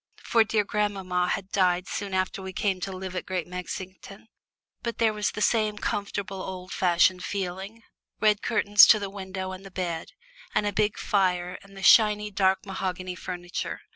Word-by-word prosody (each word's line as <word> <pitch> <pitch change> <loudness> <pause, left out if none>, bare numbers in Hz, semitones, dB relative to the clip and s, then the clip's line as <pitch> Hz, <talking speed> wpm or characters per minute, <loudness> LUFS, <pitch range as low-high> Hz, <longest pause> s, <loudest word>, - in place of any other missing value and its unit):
For 230 -1 +4
dear 215 -1 +1
grandmamma 195 -4 -1
had 195 -1 -3
died 180 -2 +2
soon 200 -2 -4
after 185 +1 -1
we 190 0 -7
came 190 -1 0
to 195 - -3
live 185 0 -6
at 185 - -4
Great 185 -3 -2
Mexington. 185 +3 -8 0.5
But 235 -1 -4
there 225 -2 +2
was 210 -1 0
the 210 - -3
same 215 -2 +2
comfortable 200 -2 -3
old 185 -1 -7
fashioned 180 0 +3
feeling: 195 +3 -5 0.4
red 210 -1 +3
curtains 205 -2 +6
to - - +7
the 200 -2 -5
window 190 -1 -5
and 185 +1 -8
the 195 - -10
bed, 175 -3 -4 0.4
and 210 - +2
a 205 - -1
big 210 -1 +1
fire 180 -2 0
and 195 0 -16
the 195 - -8
shiny 210 +1 +5
dark 190 -1 +2
mahogany 185 -2 -4
furniture. 175 -1 -5
190 Hz, 175 wpm, -26 LUFS, 185-205 Hz, 0.5 s, to